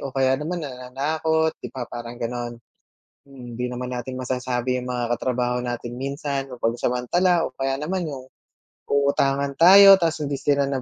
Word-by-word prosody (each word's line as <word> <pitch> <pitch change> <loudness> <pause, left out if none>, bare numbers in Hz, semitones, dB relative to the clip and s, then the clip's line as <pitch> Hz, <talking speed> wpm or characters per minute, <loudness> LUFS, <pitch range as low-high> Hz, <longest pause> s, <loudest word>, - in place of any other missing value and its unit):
o - - -4
kaya 135 +1 +2
naman 170 +1 -3
nananakot 150 +5 -1
‘di - - -6
ba, 130 -2 -6
parang 120 0 -8
gano’n. 120 0 -4 0.7
Mm, 125 -4 -11
‘di 125 +1 -3
naman 125 0 -4
natin 130 +1 -5
masasabi 125 0 -2
yung 125 0 -5
mga 120 -1 -1
katrabaho 125 0 -1
natin 120 0 -5
minsan 140 +1 -4
mapansamantala, 125 +9 +1
o 130 - -15
kaya 135 0 -2
naman 180 +4 -2
yung 130 -2 -8 0.6
uutangan 140 0 +1
tayo 195 +3 +9
tapos 160 -2 0
hindi 140 - -3
sila 140 0 +1
nag 135 -2 -2
130 Hz, 160 wpm, -23 LUFS, 125-145 Hz, 0.7 s, tayo